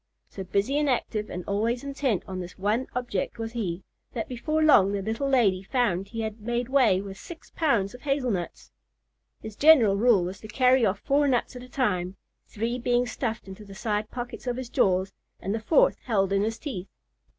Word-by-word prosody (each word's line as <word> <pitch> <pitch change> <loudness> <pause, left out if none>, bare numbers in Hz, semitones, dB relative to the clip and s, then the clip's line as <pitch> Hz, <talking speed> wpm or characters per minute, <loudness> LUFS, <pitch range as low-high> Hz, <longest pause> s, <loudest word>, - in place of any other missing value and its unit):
So 195 - -6
busy 200 +10 0
and 295 -1 +1
active 215 -4 -1
and 180 0 -6
always 225 +5 -1
intent 275 -7 -1
on 185 -1 -5
this 180 0 -8
one 210 +6 0
object 240 -6 -2
was 225 0 -4
he, 195 -6 -3 0.3
that 225 - -3
before 310 +6 -1
long 200 -10 +6
the 200 - -1
little 225 +7 -2
lady 210 -9 +3
found 195 -4 0
he 225 +2 -5
had 220 0 -5
made 240 +2 -2
way 245 -9 +4
with 195 -1 -9
six 335 -2 -11
pounds 235 - +1
of 250 - -12
hazel 275 -3 0
nuts. 175 -4 -5 0.7
His 220 -1 -7
general 250 -10 +6
rule 220 -4 +4
was 185 +2 -5
to 215 - -10
carry 255 +3 +3
off 200 +1 -2
four 285 +1 +2
nuts 255 -1 0
at 250 - -7
a 250 - -12
time—three 220 +1 -3
being 245 0 +1
stuffed 230 -4 -4
into 190 +2 -9
the 200 -1 -12
side 210 0 -2
pockets 245 +1 -7
of 245 0 -1
his 255 -2 -5
jaws, 190 -7 +1 0.3
and 195 - -3
the 225 - -1
fourth 340 - +3
held 195 -5 0
in 195 - +2
his 225 +2 -1
teeth. 200 - -6
225 Hz, 200 wpm, -26 LUFS, 195-250 Hz, 0.7 s, long